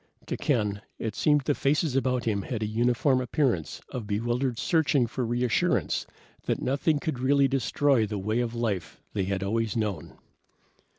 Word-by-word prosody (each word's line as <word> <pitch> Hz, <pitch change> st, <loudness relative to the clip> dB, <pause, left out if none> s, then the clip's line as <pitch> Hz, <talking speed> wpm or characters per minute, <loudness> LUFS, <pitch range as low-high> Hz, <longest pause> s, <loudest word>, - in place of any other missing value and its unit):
To -, -, -3 dB
Ken, 105 Hz, -7 st, 0 dB, 0.2 s
it 110 Hz, -2 st, -3 dB
seemed 150 Hz, +3 st, +3 dB
the 145 Hz, +2 st, +1 dB
faces 145 Hz, 0 st, +1 dB
about 125 Hz, -2 st, +1 dB
him 105 Hz, -3 st, 0 dB
had 110 Hz, +2 st, -3 dB
a -, -, 0 dB
uniform 120 Hz, +4 st, +2 dB
appearance 120 Hz, -, 0 dB
of 115 Hz, -5 st, -5 dB
bewildered 120 Hz, +4 st, -1 dB
searching 145 Hz, -3 st, +2 dB
for 125 Hz, +2 st, -3 dB
reassurance 120 Hz, 0 st, +1 dB, 0.4 s
that -, -, +1 dB
nothing 140 Hz, +4 st, +1 dB
could 145 Hz, -3 st, -3 dB
really 140 Hz, +2 st, +4 dB
destroy 135 Hz, -2 st, +2 dB
the 105 Hz, 0 st, -3 dB
way 110 Hz, +4 st, -1 dB
of 120 Hz, -1 st, -2 dB
life 100 Hz, -9 st, -2 dB
they 95 Hz, -, 0 dB
had 95 Hz, 0 st, -2 dB
always 115 Hz, +2 st, -1 dB
known. 105 Hz, -8 st, -3 dB
120 Hz, 165 wpm, -27 LUFS, 110-135 Hz, 0.4 s, really